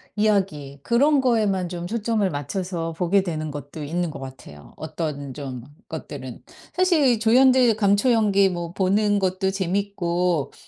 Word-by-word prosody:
이야기, 190 -10 0
그런 280 - +3
거에만 210 -7 +1
좀 175 -1 -5
초점을 215 -1 0
맞춰서 165 +3 -4
보게 180 +4 +1
되는 155 -4 -4
것도 145 +1 -8
있는 170 +3 -2
것 - - -8
같아요. 130 - -11
어떤 150 -4 -5
좀 130 -4 -7 0.3
것들은. - - -7 0.3
사실 315 - +3
조연들 250 +1 +5
감초 205 +3 +3
연기 200 -3 +3
뭐 175 -2 -4
보는 205 +2 +2
것도 190 0 0
재밌고 180 -4 -1
190 Hz, 280 characters per minute, -23 LUFS, 160-215 Hz, 0.3 s, 조연들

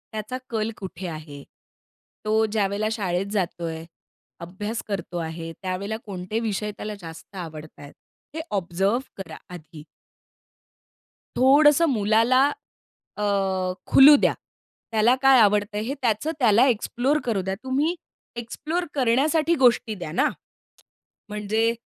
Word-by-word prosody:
त्याचा 220 +4 -4
कल 220 -1 -1
कुठे 190 -1 -7
आहे? 155 -3 -8 0.8
तो 220 +1 +2
ज्यावेळेला 205 -1 -1
शाळेत 190 -4 -1
जातो 180 -4 -2
आहे, 160 0 -5 0.5
अभ्यास 205 +6 -5
करतो 185 -4 -4
आहे 165 0 -5
त्यावेळेला 195 +3 -3
कोणते 195 +2 -4
विषय 210 -2 -2
त्याला 210 0 -5
जास्त 165 +3 -11
आवडतायेत? 155 -4 -9 0.4
हे 320 - -2
ऑब्झर्व्ह 195 +3 0 0.2
करा 190 - -8 0.2
आधी. 160 -3 -11 1.5
थोडंसं 295 +5 +6
मुलाला 225 +5 +4 0.7
अ, 210 - -2 0.7
खुलू 285 +2 +9
द्या. - - +2 0.6
त्याला 225 +3 +4
काय 270 -1 +6
आवडतंय 210 0 +2
हे 240 +5 -3
त्याचं 235 +5 0
त्याला 235 -1 +5
एक्सप्लोर 255 +4 0
करू 220 -5 0
द्या. 190 +1 -3
तुम्ही 280 +6 0 0.4
एक्सप्लोर 305 +9 -3
करण्यासाठी 295 +6 +2
गोष्टी 235 -3 +3
द्या 175 -5 -7
ना. 165 - +2 1.0
म्हणजे 215 +2 0
210 Hz, 120 wpm, -24 LUFS, 185-240 Hz, 1.5 s, खुलू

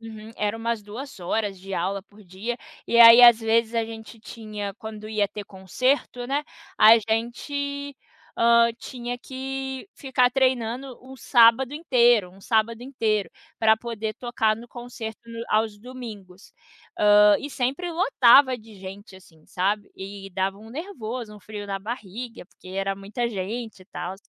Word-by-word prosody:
Uhum, 220 -1 -10
era 210 +1 -1
umas 230 -1 -2
2 230 +4 -9
horas 195 +2 -2
de 195 +1 -7
aula 190 +3 -1
por 210 0 -19
dia, 200 +6 -5 0.3
e 235 - +3
aí 230 +1 +11
às 240 -2 +8
vezes 225 +1 +1
a 230 -1 +1
gente 225 0 -10
tinha 215 -3 -7
quando 215 -1 -9
ia 215 -2 +1
ter 205 +1 -8
conserto, 245 +7 -1
né, 280 +4 -1 0.3
a 225 +2 +9
gente, 280 +6 -3 0.4
hã, 235 0 +5
tinha 245 -1 -6
que 265 +4 -6
ficar 255 -3 +2
treinando 255 -1 0
um 265 +1 -12
sábado 245 +3 +4
inteiro 240 - +3
um 195 +2 -18
sábado 225 +2 0
inteiro, 225 -6 -1 0.3
pra 220 -1 +4
poder 220 -2 -5
tocar 230 -3 0
no 235 +2 -12
concerto 240 -3 -8
no 230 0 -7
aos 215 -1 +1
domingos. 210 -6 -11 0.4
Hã, 210 0 +6
e 285 - -6
sempre 275 +8 -2
lotava 275 - +5
de 220 -2 -15
gente, 190 +1 -10
assim, 160 -4 -20
sabe. 200 +3 -1
E 195 0 -8
dava 190 +2 -2
um 220 +2 -13
nervoso, 245 - -6
um 205 - -14
frio 205 0 -8
na 195 -1 -3
barriga 230 -1 -7
porque 185 - -17
era 195 +1 -2
muita 205 +5 -3
gente 220 +1 -5
e - - -19
tals. 190 -1 -6
225 Hz, 160 wpm, -24 LUFS, 205-245 Hz, 0.4 s, aí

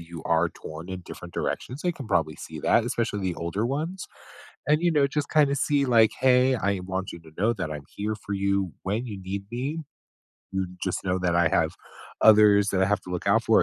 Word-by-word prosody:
you 85 -1 -9
are 85 +1 +2
torn 80 +1 -9
in 95 -1 -6
different 90 +1 -10
directions, 130 +4 -3
they 175 -1 +1
can 135 -8 -9
probably 80 -6 +1
see - - -9
that, 115 - +3
especially 115 -3 -1
the 95 -2 -1
older 85 +6 -2
ones. 160 +8 -3 0.6
And, 150 +2 +3
you 175 - +4
know, 145 -3 +3
just 145 +1 -2
kinda 145 -3 +4
see, 145 0 +1
like, 115 -4 +5
"Hey, 130 0 +4
I 100 -5 -1
want 95 +1 -4
you - - -9
to 80 -1 -16
know 110 +5 +2
that 95 -7 -4
I'm 75 -2 -6
here 105 +1 -2
for 100 -1 -6
you 100 -3 0
when 105 +6 -1
you 105 -4 -6
need 95 +1 -5
me. 140 +7 -3 0.7
You 95 -1 -1 0.2
just - - -2
know 95 0 0
that 90 -2 +1
I 85 -2 +4
have - - +1 0.4
others 105 -2 +6
that 95 -1 +1
I - - +4
have 105 +1 +1
to - - -10
look 90 -1 -4
out - - +3
for, - - +5
100 Hz, 225 wpm, -26 LUFS, 90-125 Hz, 0.7 s, others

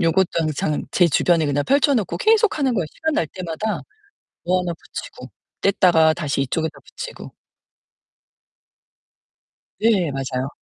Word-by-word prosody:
요것도 175 +2 +3
항상 155 -1 -1
제 175 -2 +4
주변에 165 +1 +2
그냥 145 0 0
펼쳐 280 +1 +3
놓고 215 -8 -1
계속하는 425 - +3
거예요. 185 -6 0
시간 320 -1 -2
날 165 - +1
때마다 185 +4 -3 0.6
뭐 185 +1 +2
하나 175 -1 -3
붙이고 - - -9 0.3
뗐다가 175 -5 +4
다시 145 -5 -1
이쪽에다 160 +4 -2
붙이고. - - -9 2.5
네 200 -8 +3
맞아요. 130 -1 -3
175 Hz, 285 characters per minute, -21 LUFS, 155-220 Hz, 2.5 s, 제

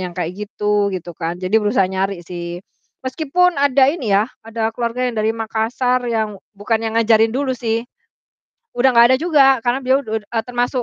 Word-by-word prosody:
yang 180 -1 -5
kayak 175 -1 -2 0.2
gitu, 210 -1 0
gitu 175 -1 -6
kan, 170 +1 -3
jadi 185 +4 +1
berusaha 210 -1 +2
nyari 190 -2 -3
sih. 175 0 -6 0.4
Meskipun 320 +7 +1
ada 275 -1 +4
ini 265 -10 -4
yah, 210 +3 +3 0.2
ada 225 0 -2
keluarga 240 +1 -2
yang 245 - -3
dari 215 +1 +1
Makassar 230 +3 -1
yang 220 -2 -1 0.2
bukan 220 +3 0
yang 225 0 -3
ngajarin 225 0 +4
dulu 270 0 0
sih, 230 -1 -2 0.9
udah 255 +2 +4
gak 235 - +8
ada - - +4
juga 280 -6 +4
karena 245 +2 +1
beliau 265 +2 +3
ud 220 -1 -3
e 225 +2 -4
termasuk 245 +1 -1
225 Hz, 185 wpm, -19 LUFS, 205-255 Hz, 0.9 s, gak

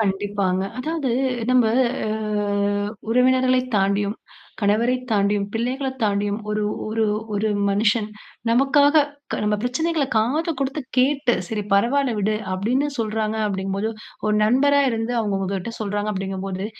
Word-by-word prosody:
கண்டிப்பாங்க. 195 -2 0 0.2
அதாவது, 305 -1 -2 0.4
நம்ப 250 -2 +4 0.4
அ - - -1 1.0
உறவினர்களைத் 255 +1 +3
தாண்டியும், 200 +1 +1 0.5
கணவரை 220 +4 +2 0.2
தாண்டியும், 200 -1 +1
பிள்ளைகளைத் 260 +3 -2
தாண்டியும் 205 0 0
ஒரு, 210 0 0 0.2
ஒரு, 220 +1 0 0.3
ஒரு, 215 +2 0 0.2
மனுஷன் 210 +1 +2 0.4
நமக்காக 285 +4 +5 0.3
க - - 0
நம்ப 210 0 +1
பிரச்சனைகள 315 +5 0
காது 280 +10 +1
குடுத்து 275 +2 -2 0.2
கேட்டு, 270 0 +3
சரி 210 0 -3
பரவால்ல 245 +6 +3
விடு! 210 +2 +1 0.2
அப்பிடீன்னு 240 +9 0
சொல்லுறாங்க, 220 -1 -1
அப்பழடீங்கம்போது, 195 +2 -2 0.4
ஒரு 210 - +2
நண்பரா 275 +6 +4
இருந்து 225 +1 -2
அவுங்க 205 -3 0
உங்கக்கிட்ட 195 +3 -3
சொல்றாங்க 205 0 -2
அப்பிடிங்கம்போது, 190 0 -4
220 Hz, 120 wpm, -22 LUFS, 205-255 Hz, 1.0 s, நமக்காக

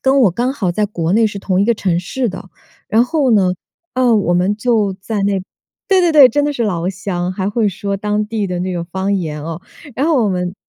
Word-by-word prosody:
跟 270 +1 +3
我 200 - +5
刚 245 +8 -1
好 195 -10 -1
在 210 +4 0
国 170 -4 -2
内 225 +1 +4
是 205 -1 -5
同 190 -1 0
一 - - +3
个 235 +1 +2
城 180 -5 0
市 245 +7 -2
的。 190 0 -8 0.4
然 225 +3 +3
后 285 -3 +1
呢， 190 -4 +3 0.4
呃， 250 -2 +3
我 180 -4 +2
们 185 +4 +1
就 215 -4 +1
在 205 0 -3
那 200 -1 +1 0.5
对 385 -1 +4
对 345 -2 +2
对， 280 -4 +8
真 290 +1 +1
的 295 - 0
是 240 - -2
老 175 -4 -1
乡， 185 -2 -3
还 190 +1 -2
会 215 0 +1
说 200 +1 -3
当 210 +1 -1
地 215 -2 -2
的 180 -1 -3
那 185 0 -2
个 170 -1 -3
方 190 +3 -2
言 155 -5 -3
哦。 165 +2 -6 0.3
然 275 +6 0
后 290 -8 +3
我 - - +1
们 180 0 -2
205 Hz, 260 characters per minute, -17 LUFS, 185-235 Hz, 0.5 s, 对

